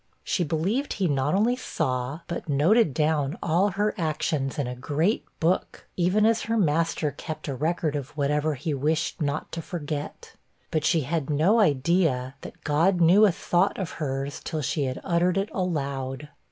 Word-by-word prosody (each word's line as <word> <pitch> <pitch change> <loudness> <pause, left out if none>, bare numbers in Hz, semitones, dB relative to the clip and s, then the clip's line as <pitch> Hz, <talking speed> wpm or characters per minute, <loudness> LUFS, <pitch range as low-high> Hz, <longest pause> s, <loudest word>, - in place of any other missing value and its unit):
She 180 - 0
believed 180 - -1
he 190 -3 0
not 145 +2 +1
only 225 +5 +3
saw, 130 - -2
but 170 -2 -5
noted 160 +7 +4
down 150 +1 0
all 175 +5 +2
her 205 +3 0
actions 155 -4 -1
in 145 - 0
a 125 - -4
great 150 - 0 0.2
book, 170 +3 0
even 185 +4 +2
as 225 0 +3
her 230 0 -1
master 165 -4 +1
kept 155 +4 -7
a 140 - -2
record 155 +2 -1
of 145 +1 -6
whatever 150 +1 +1
he 150 +4 -3
wished 155 +4 -1
not 145 +1 -2
to 165 - -4
forget. 150 -3 -6 0.4
But 155 -2 0
she 165 -1 +3
had 155 +1 -2
no 165 +10 +3
idea 145 - +2
that - - -11
God 165 +5 +2
knew 180 +6 +6
a - - +3
thought 175 +2 +1
of 190 -4 -3
hers 135 -1 -3
till 155 -3 -3
she 140 +1 0
had 130 0 -3
uttered 175 0 +1
it 195 +2 0
aloud. 140 -6 -3
155 Hz, 175 wpm, -26 LUFS, 145-180 Hz, 0.4 s, knew